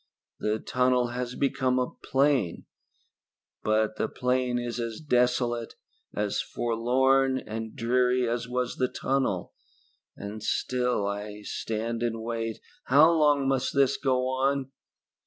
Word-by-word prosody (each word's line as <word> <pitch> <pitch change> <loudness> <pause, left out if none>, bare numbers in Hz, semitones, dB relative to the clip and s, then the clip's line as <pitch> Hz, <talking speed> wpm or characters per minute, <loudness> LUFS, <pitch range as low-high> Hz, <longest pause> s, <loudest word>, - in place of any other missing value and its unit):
The 105 +1 0
tunnel 125 +1 +1
has 125 0 -4
become 130 -2 +1
a 125 -1 0
plain, 135 - 0 1.0
but 110 0 +1
the - - -1
plain 125 -1 0
is 120 0 -3
as 115 -2 -4
desolate, 125 -4 +1 0.4
as 105 -1 -1
forlorn 130 +3 +2
and 110 -1 -6
dreary 125 +1 +2
as 120 0 -2
was 125 0 -2
the 130 - +2
tunnel, 130 -9 -1 0.6
and 105 +2 -7
still 125 0 0
I 105 +1 -5
stand 115 +2 -3
and 115 -1 -2
wait. 115 -1 -3 0.2
How 150 +6 +6
long 145 -4 +3
must 135 0 0
this 140 -1 +4
go 130 -2 +1
on?" 135 +1 0
125 Hz, 125 wpm, -27 LUFS, 115-130 Hz, 1.0 s, How